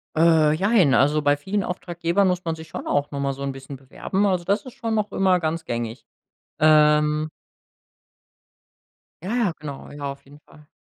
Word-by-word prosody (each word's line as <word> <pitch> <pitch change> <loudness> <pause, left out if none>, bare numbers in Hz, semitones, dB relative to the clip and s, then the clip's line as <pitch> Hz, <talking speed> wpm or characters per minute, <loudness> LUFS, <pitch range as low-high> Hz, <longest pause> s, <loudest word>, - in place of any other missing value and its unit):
Äh, 160 -2 +4
jein, 190 - +3
also 145 +3 +3
bei 145 0 +2
vielen 190 +7 -2
Auftraggebern 175 +1 -1
muss 180 0 0
man 165 -1 -1
sich 160 0 -11
schon - - -7
auch 145 0 0
noch 140 - -4
mal 140 0 -1
so 140 +1 -7
'n 140 - -2
bisschen 135 +1 -9
bewerben. 135 +9 -2
Also, 185 -3 0
das 200 +9 0
ist 255 - -10
schon 225 -1 -3
noch 210 -1 -1
immer 185 -2 +2
ganz 160 0 -2
gängig. 115 -2 -4 0.5
Ähm 150 0 +4 1.9
Ja, 205 +6 -3
ja, 230 -7 +1
genau. 145 -2 -8
Ja, 145 -1 -5
auf 140 - -11
jeden 145 +2 -16
Fall. 150 -1 -20
155 Hz, 185 wpm, -23 LUFS, 145-185 Hz, 1.9 s, Äh